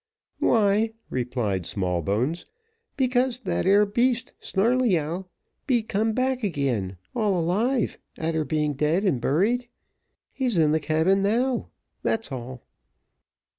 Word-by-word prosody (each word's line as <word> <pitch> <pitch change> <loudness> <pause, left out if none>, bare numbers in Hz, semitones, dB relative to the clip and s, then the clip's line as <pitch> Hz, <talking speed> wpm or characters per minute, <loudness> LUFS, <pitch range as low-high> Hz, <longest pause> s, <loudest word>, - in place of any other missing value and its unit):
"Why," 215 0 +3 0.2
replied 120 -8 -1
Smallbones, 100 - -1 0.5
"because 255 -1 +2
that 190 - -1
'ere 200 +2 +6
beast, 240 +3 0
Snarleyyow, 190 -6 +1 0.4
be 245 -5 +2
come 220 +1 0
back 255 +1 0
again, 125 - -1 0.2
all 210 -6 +1
alive, 215 +9 0 0.2
a'ter 160 -1 -1
being 150 -1 0
dead 150 +7 +1
and 160 - +1
buried 215 - +1 0.7
he's 250 -7 0
in 155 -2 +4
the 160 - +2
cabin 160 +6 +2
now 240 +5 +1 0.3
that's 225 -8 -1
all." 125 -1 -7
190 Hz, 115 wpm, -25 LUFS, 145-230 Hz, 0.7 s, ere